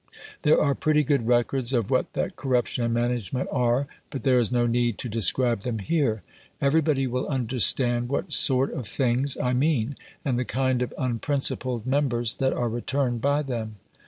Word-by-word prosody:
There 150 Hz, -, +4 dB
are 140 Hz, -, +2 dB
pretty 150 Hz, +1 st, +2 dB
good 140 Hz, -4 st, 0 dB
records 120 Hz, +1 st, +1 dB
of 115 Hz, -5 st, 0 dB
what -, -, +1 dB
that -, -, -2 dB
corruption 125 Hz, -2 st, 0 dB
and 115 Hz, -, 0 dB
management 120 Hz, +1 st, -1 dB
are, 125 Hz, 0 st, +1 dB, 0.2 s
but 135 Hz, -5 st, -6 dB
there 130 Hz, -2 st, +4 dB
is 120 Hz, -1 st, 0 dB
no 120 Hz, -1 st, +2 dB
need 120 Hz, -1 st, +1 dB
to -, -, -5 dB
describe 115 Hz, +1 st, +1 dB
them 115 Hz, +1 st, -3 dB
here. 115 Hz, -, 0 dB, 0.4 s
Everybody 145 Hz, -1 st, +2 dB
will 125 Hz, 0 st, -2 dB
understand 120 Hz, -1 st, +1 dB
what 140 Hz, -, -2 dB
sort 135 Hz, 0 st, +2 dB
of 125 Hz, -5 st, -4 dB
things 130 Hz, +1 st, 0 dB
I 125 Hz, -, 0 dB
mean, 135 Hz, -1 st, +1 dB, 0.3 s
and 125 Hz, -3 st, 0 dB
the -, -, 0 dB
kind 130 Hz, 0 st, 0 dB
of 125 Hz, -, -2 dB
unprincipled 130 Hz, -2 st, -1 dB
members 130 Hz, -4 st, 0 dB
that 130 Hz, -1 st, +1 dB
are 120 Hz, -, -1 dB
returned 120 Hz, +1 st, -1 dB
by 145 Hz, +3 st, +1 dB
them. 115 Hz, -5 st, -4 dB
125 Hz, 175 wpm, -25 LUFS, 120-135 Hz, 0.4 s, There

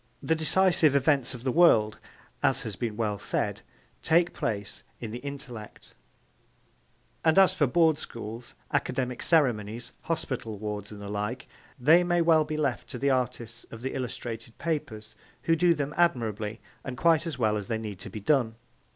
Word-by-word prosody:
'The 160 Hz, -, +2 dB
decisive 160 Hz, -1 st, +3 dB
events 140 Hz, -2 st, +2 dB
of 120 Hz, -, -10 dB
the 130 Hz, -, +1 dB
world,' 115 Hz, -10 st, +4 dB, 0.4 s
as -, -, +2 dB
has 105 Hz, -, -5 dB
been 110 Hz, -1 st, -3 dB
well 105 Hz, -3 st, -1 dB
said, -, -, -1 dB, 0.4 s
'take 170 Hz, +2 st, +3 dB
place 100 Hz, -3 st, -3 dB, 0.2 s
in 115 Hz, -3 st, -6 dB
the 120 Hz, -, -5 dB
intellect,' 135 Hz, -6 st, -8 dB, 1.3 s
and 160 Hz, +1 st, +3 dB
as 195 Hz, -1 st, +7 dB
for 145 Hz, -, +2 dB
Board 160 Hz, +2 st, +3 dB
schools, 115 Hz, +1 st, -7 dB, 0.2 s
academic 125 Hz, -2 st, -1 dB
ceremonies, 120 Hz, -8 st, +1 dB
hospital 125 Hz, -9 st, -3 dB
wards 105 Hz, 0 st, -5 dB
and 105 Hz, -, -9 dB
the 100 Hz, -, -7 dB
like, 105 Hz, +5 st, -3 dB, 0.3 s
they 160 Hz, +8 st, +6 dB
may 175 Hz, 0 st, +1 dB
well 165 Hz, -2 st, +5 dB
be 155 Hz, 0 st, -4 dB
left 140 Hz, -5 st, -1 dB
to -, -, -5 dB
the 140 Hz, +3 st, +1 dB
artists 120 Hz, -2 st, -2 dB
of 115 Hz, +1 st, -10 dB
the 130 Hz, -, -3 dB
illustrated 120 Hz, -2 st, -5 dB
papers, 145 Hz, -10 st, -4 dB, 0.3 s
who 165 Hz, -, +3 dB
do 170 Hz, +1 st, +4 dB
them 145 Hz, -1 st, -3 dB
admirably 115 Hz, -, 0 dB, 0.2 s
and 125 Hz, -2 st, -6 dB
quite 165 Hz, +3 st, +3 dB
as 155 Hz, -5 st, -4 dB
well 110 Hz, -3 st, +2 dB
as 105 Hz, -2 st, -4 dB
they 110 Hz, -, -1 dB
need 105 Hz, -4 st, -6 dB
be 110 Hz, -, -6 dB
done. 115 Hz, 0 st, +2 dB
125 Hz, 170 wpm, -28 LUFS, 110-155 Hz, 1.3 s, as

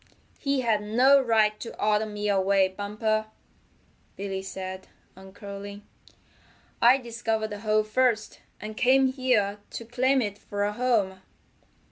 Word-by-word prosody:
"He 275 Hz, -2 st, 0 dB
had 225 Hz, -4 st, +1 dB
no 255 Hz, +7 st, +4 dB
right 215 Hz, -3 st, +2 dB
to 230 Hz, -, -8 dB
order 210 Hz, +1 st, +1 dB
me 210 Hz, 0 st, -4 dB
away, 195 Hz, -1 st, +3 dB
Bumper," 210 Hz, +3 st, -2 dB, 0.9 s
Billy 195 Hz, -1 st, -4 dB
said, 190 Hz, 0 st, -7 dB, 0.3 s
uncurling. 200 Hz, +1 st, -10 dB, 1.0 s
"I 245 Hz, +3 st, +7 dB
discovered 225 Hz, -3 st, -3 dB
the 205 Hz, -, -6 dB
hole 215 Hz, 0 st, +2 dB
first, 220 Hz, 0 st, 0 dB, 0.2 s
and 215 Hz, 0 st, -7 dB
came 265 Hz, +2 st, +4 dB
here 235 Hz, -7 st, +1 dB
to 230 Hz, -, -7 dB
claim 260 Hz, +3 st, +1 dB
it 205 Hz, -1 st, -5 dB
for 205 Hz, 0 st, -4 dB
a 205 Hz, 0 st, -1 dB
home." 210 Hz, -6 st, 0 dB
215 Hz, 130 wpm, -26 LUFS, 200-240 Hz, 1.0 s, I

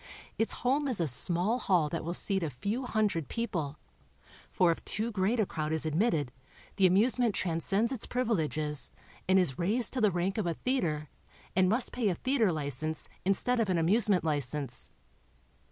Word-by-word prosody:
Its 225 Hz, -, +1 dB
home 280 Hz, +3 st, +2 dB
is 250 Hz, -7 st, 0 dB
a 165 Hz, -, +1 dB
small 175 Hz, -, +3 dB
hall 180 Hz, -9 st, +2 dB
that 165 Hz, +3 st, -4 dB
will 170 Hz, +2 st, -2 dB
seat 195 Hz, 0 st, +2 dB
a 165 Hz, -, -1 dB
few 205 Hz, -, -3 dB
hundred 205 Hz, -, 0 dB
people, 170 Hz, -11 st, -3 dB, 0.7 s
for 175 Hz, -2 st, +3 dB
if 165 Hz, -, -4 dB
too 220 Hz, +3 st, -1 dB
great 210 Hz, +3 st, 0 dB
a 215 Hz, -, +3 dB
crowd 155 Hz, -3 st, -4 dB
is 160 Hz, 0 st, -1 dB
admitted 155 Hz, -, 0 dB, 0.5 s
the 190 Hz, -2 st, +6 dB
amusement 225 Hz, +3 st, +2 dB
transceends 195 Hz, +7 st, 0 dB
its 255 Hz, -5 st, -4 dB
privileges 155 Hz, -, -1 dB, 0.4 s
and 190 Hz, -, +5 dB
is 175 Hz, -9 st, +2 dB
raised 215 Hz, +7 st, +1 dB
to 255 Hz, -, -1 dB
the 215 Hz, -, +5 dB
rank 185 Hz, +3 st, -1 dB
of 200 Hz, -, -1 dB
a 170 Hz, -, -1 dB
theater 165 Hz, -, -1 dB, 0.5 s
and 185 Hz, 0 st, +4 dB
must 235 Hz, +4 st, +1 dB
pay 235 Hz, -4 st, 0 dB
a 180 Hz, -, -1 dB
theater 250 Hz, -2 st, +1 dB
license 155 Hz, 0 st, -3 dB, 0.2 s
instead 235 Hz, +6 st, +1 dB
of 220 Hz, -4 st, +1 dB
an 180 Hz, -, +2 dB
amusement 190 Hz, +2 st, +2 dB
license. 145 Hz, -4 st, -2 dB
185 Hz, 175 wpm, -30 LUFS, 160-225 Hz, 0.7 s, the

